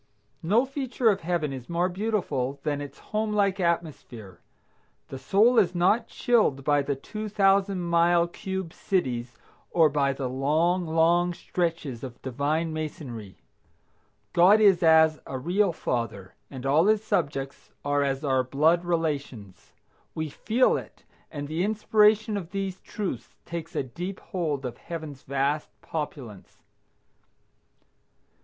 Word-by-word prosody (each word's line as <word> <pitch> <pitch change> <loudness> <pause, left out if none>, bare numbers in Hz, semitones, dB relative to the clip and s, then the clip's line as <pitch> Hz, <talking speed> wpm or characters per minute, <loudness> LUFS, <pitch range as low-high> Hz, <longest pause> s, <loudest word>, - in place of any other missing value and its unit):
No 215 +10 +3
feature 265 -3 0
of 200 - -3
Heaven 165 -4 -1
is 130 -2 -8
more 170 +1 +1
beautiful 175 - -2
than 145 -1 -1
its 140 -1 -8 0.2
home 215 0 0
like 200 -2 +1
atmosphere. 155 - -3 0.7
The 135 - -7
soul 215 - +4
is 180 -4 +2
not 210 +7 +2
chilled 215 - +1
by 145 +1 +3
the 140 0 -2
two 215 +10 -6
thousand 195 -1 +2
mile 170 0 +3
cube 190 -1 -5
cities, 125 - -2 0.3
or 165 -3 +4
by 140 -1 +1
the 135 -1 -3
long, 160 +7 +1
long 170 +2 +2
stretches 165 -11 -3
of 125 -3 -8
Divine 150 +5 -1
masonry. 130 - -7 0.9
God 185 +5 +6
is 200 -5 +5
as 160 -1 +5
a 130 - -4
real 180 +8 +1
father, 115 - -4 0.2
and 130 -1 -8
all 150 +7 +4
his 215 0 +3
subjects 140 -9 -2 0.2
are 145 0 +1
as 135 0 -1
our 130 -2 +2
blood 155 +7 +2
relations. 145 - -3 0.4
We 160 -1 -3
feel 235 - +2
it, - - -10 0.3
and 145 -2 -6
the 160 +4 -1
inspiration 215 0 +3
of 175 -4 -6
these 195 -1 -4
truths 185 - -5
takes 170 -1 -6
a - - 0
deep 175 +10 -6
hold 150 -7 -3
of 120 -1 -5
Heaven's 155 -5 -7
vast 140 +3 -1
populace. 135 - -7
165 Hz, 135 wpm, -26 LUFS, 140-190 Hz, 0.9 s, God